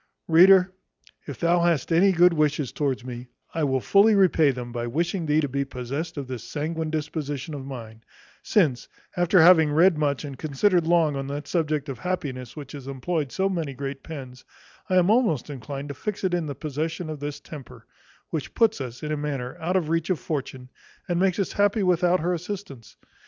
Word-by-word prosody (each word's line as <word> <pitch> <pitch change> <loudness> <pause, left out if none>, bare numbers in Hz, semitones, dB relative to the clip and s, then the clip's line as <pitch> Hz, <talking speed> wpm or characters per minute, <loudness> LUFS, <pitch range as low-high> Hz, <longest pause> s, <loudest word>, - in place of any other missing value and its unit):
Reader, 185 +2 +6 0.5
if 140 -5 -7
thou 170 +1 +3
hast 170 -3 +1
any 185 +4 +5
good 175 0 +5
wishes 150 -4 0
towards 135 -4 -2
me, 125 0 -7 0.3
I 160 - -1
will 135 -2 +1
fully 205 - +5
repay 180 -6 +4
them 125 -2 -4
by 120 0 -3
wishing 170 +6 -1
thee 150 +1 +3
to 145 - -1
be 140 +1 -1
possessed 135 +5 -5
of 140 - -3
this 125 -3 -6
sanguine 160 +1 -3
disposition 150 -1 -4
of 135 -2 -6
mind; 115 -4 -9 0.4
since, 150 - +1 0.3
after 175 +1 +3
having 160 -3 +6
read 165 +1 +4
much 145 -1 0
and 135 -3 -8
considered 165 +3 +1
long 165 -4 +3
on 135 0 -4
that 145 +1 -5
subject 155 -4 -1
of 135 -5 -6
happiness 135 -9 -4
which 150 -2 -9
hath 140 -3 -9
employed 140 +1 -2
so 190 0 0
many 165 -8 -3
great 135 0 -5
pens, 130 -5 -9 0.5
I 185 - +1
am 180 +2 +4
almost 215 - +1
inclined 140 +2 -6
to - - -4
fix 205 +9 -5
it 185 -2 0
in 170 -3 0
the 140 - -5
possession 160 +3 -4
of 155 -2 -6
this 145 0 -5
temper; 145 -4 -11 0.5
which 155 -4 -4
puts 225 -8 +2
us, 125 0 -7
in 150 - -3
a 155 - -1
manner, 140 -4 -4
out 175 +3 -2
of 185 -4 +2
the 155 - -4
reach 165 +1 0
of 185 - 0
Fortune, 130 -4 -5 0.4
and 175 -2 0
makes 190 -1 +2
us 195 - -1
happy 205 +1 +2
without 180 -1 +2
her 175 +2 0
assistance. 180 - -7
155 Hz, 200 wpm, -25 LUFS, 135-175 Hz, 0.5 s, Reader